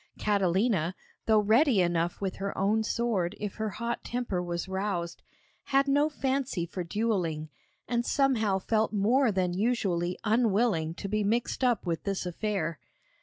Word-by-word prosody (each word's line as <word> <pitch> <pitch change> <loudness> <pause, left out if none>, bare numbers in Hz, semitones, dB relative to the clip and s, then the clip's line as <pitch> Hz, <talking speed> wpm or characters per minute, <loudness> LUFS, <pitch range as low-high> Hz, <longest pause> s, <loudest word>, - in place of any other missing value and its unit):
Catalina, 190 -2 +1 0.3
though 215 -1 +5
ready 230 +3 +4
enough 175 -1 +1
with 195 -2 -3
her 195 +1 -4
own 210 +3 +2
sword 215 -5 -1
if 205 -2 -5
her 220 0 -1
hot 235 +3 -4
temper 240 -7 -2
was 175 0 -3
roused, 190 -3 -3 0.4
had 275 0 +2
no 290 +2 +3
fancy 265 - -1
for 180 +1 -5
duelling, 170 -6 -1 0.4
and 240 -1 0
somehow 240 -8 +2
felt 215 +3 0
more 230 +5 +3
than 185 -2 0
usually 185 -5 0
unwilling 215 -7 +2
to 195 - -5
be 215 +1 0
mixed 235 +5 0
up 245 -6 +2
with 170 -2 -1
this 195 -2 -2
affair. 180 - -2
205 Hz, 150 wpm, -29 LUFS, 180-235 Hz, 0.4 s, though